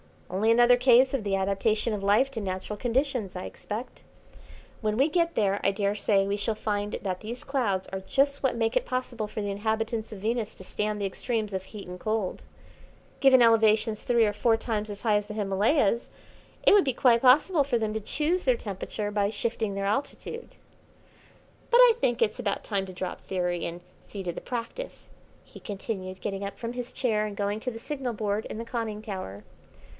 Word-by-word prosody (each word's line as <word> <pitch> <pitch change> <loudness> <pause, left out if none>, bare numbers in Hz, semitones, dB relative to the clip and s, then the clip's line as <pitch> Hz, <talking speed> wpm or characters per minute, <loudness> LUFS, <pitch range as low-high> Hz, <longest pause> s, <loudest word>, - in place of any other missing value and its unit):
"Only 200 +4 +1
another 240 +1 +6
case 255 +1 +5
of 265 -5 -1
the 200 -1 0
adaptation 200 +4 +1
of 205 - -3
life 210 +7 +3
to 230 -4 -4
natural 190 +2 -4
conditions, 245 -4 -1
I 180 - -4
expect. 220 +5 -7 0.8
When 215 -1 -1
we 275 +5 +4
get 335 +1 +1
there 200 -2 +2
I - - +4
daresay 200 0 +1
we 200 +1 -1
shall 215 +2 -1
find 205 -1 -2
that 185 -2 -2
these 235 +3 -7
clouds 220 -9 -1
are 190 - -4
just 280 +8 +1
what 265 -3 +1
make 225 0 0
it - - +2
possible 250 -4 -3
for 215 0 -5
the 205 -1 -2
inhabitants 220 +2 -2
of 210 - -7
Venus 225 +1 -2
to - - -11
stand 210 +2 -2
the 200 - -1
extremes 215 +1 -2
of 190 -1 -2
heat 200 +1 -9
and 180 0 -8
cold. 215 -2 -2 0.8
Given 260 -3 +6
elevations 220 -1 +4
three 235 -2 +3
or 205 - 0
four 225 +2 +2
times 220 -2 -3
as 205 0 -6
high 215 -3 +4
as 205 0 -3
the 210 - -6
Himalayas, 210 +4 +1 0.5
it - - +6
would 410 -2 +6
be 265 - +1
quite 235 -1 +4
possible 285 +4 +5
for 255 -3 +1
them 220 -2 -1
to 220 - -1
choose 315 - 0
their 255 -3 +3
temperature 205 0 -4
by 205 -1 +1
shifting 220 -1 -2
their 195 0 -2
altitude. 285 - -3 1.1
"But 475 - +5
I - - +8
think 240 - +1
it's 215 +3 +1
about 205 -5 -1
time 195 -3 -1
to 185 - -8
drop 180 0 -5
theory 180 -2 -2
and 170 +1 -5 0.3
see 200 -2 -6
to 175 - -2
the - - -7
practice," 245 - -6 0.3
he - - -14
continued, 190 -2 -5
getting 195 -1 -3
up 200 - -5
from 235 0 -5
his 245 0 -5
chair 215 -4 +1
and 205 - -7
going 205 +1 -1
to 250 - -3
the 225 - -7
signal 265 -1 -4
board 210 0 -2
in - - -6
the 230 - -5
conning 225 -3 -3
tower. 185 - -6
215 Hz, 200 wpm, -27 LUFS, 200-245 Hz, 1.1 s, I